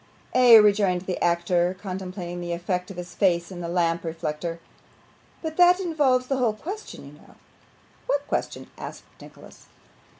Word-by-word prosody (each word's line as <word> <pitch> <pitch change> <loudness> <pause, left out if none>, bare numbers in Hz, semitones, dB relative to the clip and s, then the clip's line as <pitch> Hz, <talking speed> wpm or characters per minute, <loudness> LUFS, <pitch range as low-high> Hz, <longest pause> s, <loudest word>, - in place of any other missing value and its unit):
'Ay,' 245 -2 +8
rejoined 205 -4 +3
the 185 -1 -3
actor, 175 +1 +1
contemplating 185 -2 -6
the 175 0 -3
effect 180 +1 -3
of 195 - -9
his 180 0 -7
face 175 -2 +1
in 175 -1 -7
a - - -3
lamp 170 -1 0
reflector, 165 0 -4 0.8
'but 315 -1 -5
that 360 +1 +6
involves 290 -8 +1
the 270 +1 -1
whole 240 -4 +1
question, 390 - -8
you - - -12
know.' - - -19 0.7
'What 285 0 0
question?' - - -4
asked - - -8 0.2
Nicholas. - - -15
185 Hz, 155 wpm, -25 LUFS, 175-255 Hz, 0.8 s, Ay